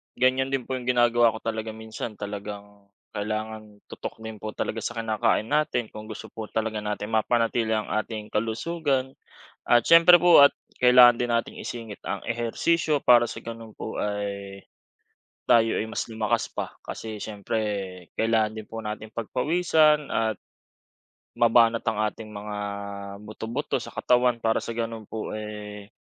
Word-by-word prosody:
ganyan 130 Hz, +1 st, +2 dB
din 135 Hz, -2 st, 0 dB
po 130 Hz, -, -10 dB
yung 125 Hz, -, -10 dB
ginagawa 120 Hz, -2 st, +4 dB
ko -, -, -6 dB
talaga 110 Hz, -1 st, -3 dB
minsan 110 Hz, 0 st, -7 dB
talagang 100 Hz, 0 st, -8 dB, 0.2 s
kailangan 110 Hz, 0 st, -5 dB
tutok -, -, -7 dB
din 110 Hz, -2 st, -7 dB
po 110 Hz, +1 st, -5 dB
talaga 115 Hz, -, -2 dB
sa -, -, -3 dB
kinakain 110 Hz, 0 st, +1 dB
natin 145 Hz, -6 st, 0 dB
kung 110 Hz, 0 st, -9 dB
gusto 110 Hz, 0 st, -8 dB
po 110 Hz, -1 st, -7 dB
talaga 110 Hz, -1 st, -2 dB
natin 105 Hz, 0 st, -4 dB
mapanatili 115 Hz, 0 st, +1 dB
ang 105 Hz, -1 st, -3 dB
ating 110 Hz, 0 st, -3 dB
kalusugan. 130 Hz, +5 st, -1 dB, 0.5 s
At 120 Hz, -1 st, +3 dB
siyempre 170 Hz, +1 st, +8 dB
po 175 Hz, -4 st, +8 dB
at 140 Hz, -, +7 dB, 0.3 s
kailangan 125 Hz, -1 st, +8 dB
din 120 Hz, 0 st, -1 dB
natin 115 Hz, 0 st, -1 dB
isingit 115 Hz, -4 st, -7 dB
ang -, -, -3 dB
ehersisyo 145 Hz, +7 st, +1 dB
para 120 Hz, -2 st, +6 dB
sa -, -, -7 dB
ganun 115 Hz, -1 st, -9 dB
po -, -, -5 dB
ay, 100 Hz, -1 st, -4 dB, 0.8 s
tayo 115 Hz, -1 st, +4 dB
ay -, -, 0 dB
mas -, -, -3 dB
lumakas 110 Hz, -1 st, -1 dB
pa. -, -, -6 dB
Kasi 110 Hz, -2 st, -7 dB
siyempre 105 Hz, +1 st, -3 dB, 0.6 s
kailangan 110 Hz, -1 st, +1 dB
din 110 Hz, -, -6 dB
po 115 Hz, -, -7 dB
natin 110 Hz, 0 st, -6 dB
pagpawisan 150 Hz, +5 st, +2 dB
at 110 Hz, -2 st, -1 dB, 1.0 s
mabanat 115 Hz, -1 st, +4 dB
ang 110 Hz, -2 st, 0 dB
ating 110 Hz, -1 st, -11 dB
mga 105 Hz, 0 st, -6 dB, 0.6 s
buto, 110 Hz, +1 st, -8 dB
buto 130 Hz, +6 st, -2 dB
sa 120 Hz, -, -8 dB
katawan 125 Hz, -1 st, +2 dB
para 110 Hz, 0 st, +2 dB
sa 115 Hz, -, -5 dB
ganun 115 Hz, -2 st, -4 dB
po, 110 Hz, -1 st, -5 dB
eh, 105 Hz, -1 st, -8 dB
110 Hz, 155 wpm, -26 LUFS, 105-120 Hz, 1.0 s, siyempre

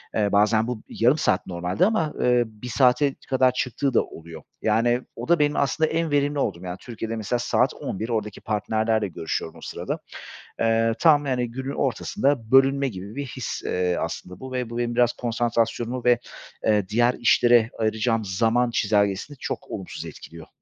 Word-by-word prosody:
eee, 105 Hz, -2 st, +1 dB
bazen 110 Hz, +2 st, +3 dB
bu 125 Hz, -3 st, -4 dB
yarım 125 Hz, +7 st, +3 dB
saat 95 Hz, -10 st, +1 dB
normalde 90 Hz, -, 0 dB
ama, 180 Hz, -9 st, 0 dB
eee, 125 Hz, -1 st, +4 dB
1 110 Hz, +2 st, -11 dB
saate 135 Hz, +3 st, +3 dB
kadar 130 Hz, -1 st, +4 dB
çıktığı 130 Hz, +2 st, -1 dB
da -, -, +4 dB
oluyor. 80 Hz, -1 st, -11 dB, 0.2 s
Yani 120 Hz, +3 st, +2 dB
o -, -, -6 dB
da 170 Hz, -2 st, +4 dB
benim 145 Hz, 0 st, +2 dB
aslında 150 Hz, +3 st, +1 dB
en 165 Hz, -1 st, -1 dB
verimli 145 Hz, 0 st, +1 dB
olduğum, 85 Hz, -9 st, -1 dB
yani 90 Hz, 0 st, -5 dB
Türkiye’de 115 Hz, -1 st, -5 dB
mesela 110 Hz, +3 st, -2 dB
saat 120 Hz, -, +1 dB
11.00 110 Hz, +5 st, -5 dB
oradaki 105 Hz, -3 st, -3 dB
partnerlerle 110 Hz, 0 st, 0 dB
görüşüyorum 80 Hz, -2 st, -4 dB
o -, -, -14 dB
sırada. -, -, -4 dB, 0.6 s
Eee, 115 Hz, 0 st, +2 dB
tam, 150 Hz, -3 st, +5 dB
yani 125 Hz, -3 st, -1 dB
günün 135 Hz, +3 st, -5 dB
ortasında 135 Hz, -2 st, -1 dB
bölünme 135 Hz, +1 st, +5 dB
gibi 100 Hz, +3 st, -8 dB
bir 140 Hz, -, -3 dB
his, 125 Hz, -, -5 dB
eee, 90 Hz, -1 st, 0 dB
aslında 90 Hz, 0 st, -5 dB
bu 130 Hz, 0 st, -8 dB
ve 125 Hz, -2 st, -2 dB
bu 120 Hz, -, -6 dB
benim 120 Hz, -1 st, -1 dB
biraz 120 Hz, -1 st, +3 dB
konsantrasyonumu 120 Hz, +1 st, -1 dB
ve, 120 Hz, -1 st, +5 dB, 0.5 s
eee, 105 Hz, -3 st, +2 dB
diğer 120 Hz, +3 st, +3 dB
işlere 120 Hz, -1 st, +4 dB
ayıracağım 110 Hz, 0 st, 0 dB
zaman 115 Hz, +5 st, +1 dB
çizelgesini 105 Hz, +5 st, 0 dB
çok -, -, -5 dB
olumsuz 95 Hz, -3 st, -6 dB
etkiliyor. 80 Hz, -1 st, -11 dB
120 Hz, 170 wpm, -24 LUFS, 105-130 Hz, 0.6 s, tam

